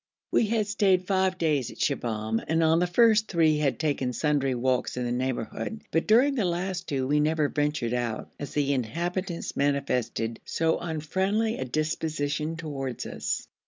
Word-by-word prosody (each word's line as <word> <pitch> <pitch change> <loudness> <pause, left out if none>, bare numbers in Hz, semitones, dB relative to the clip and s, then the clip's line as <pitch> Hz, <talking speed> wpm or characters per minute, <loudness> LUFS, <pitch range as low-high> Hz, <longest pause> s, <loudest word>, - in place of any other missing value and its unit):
We 225 - +3
had 220 -1 +1
stayed 195 -3 +2
five 190 -1 +1
days 150 -7 +1
in - - -10
Shibahm, 110 -5 -1
and 165 +1 +2
on 160 +1 +4
the 180 - +2
first 220 +3 +4
three 160 -4 +3
had 135 -6 +1
taken 140 -5 -1
sundry 140 -1 +1
walks 125 +1 0
in 125 - -1
the 120 - -2
neighbourhood, 130 - -3
but 165 - +1
during 250 +6 +5
the 245 -6 0
last 180 +1 -2
two 135 -2 -1
we 145 +3 +2
never 155 -1 +2
ventured 145 -5 -1
out, 120 -3 -2
as 145 - -6
the 140 -1 +2
inhabitants 170 - -3
manifested 130 -5 0
so 165 0 0
unfriendly 190 +7 -1
a 130 - -2
disposition 155 +2 -2
towards 135 -6 -4
us. - - -3
155 Hz, 165 wpm, -27 LUFS, 130-180 Hz, -, during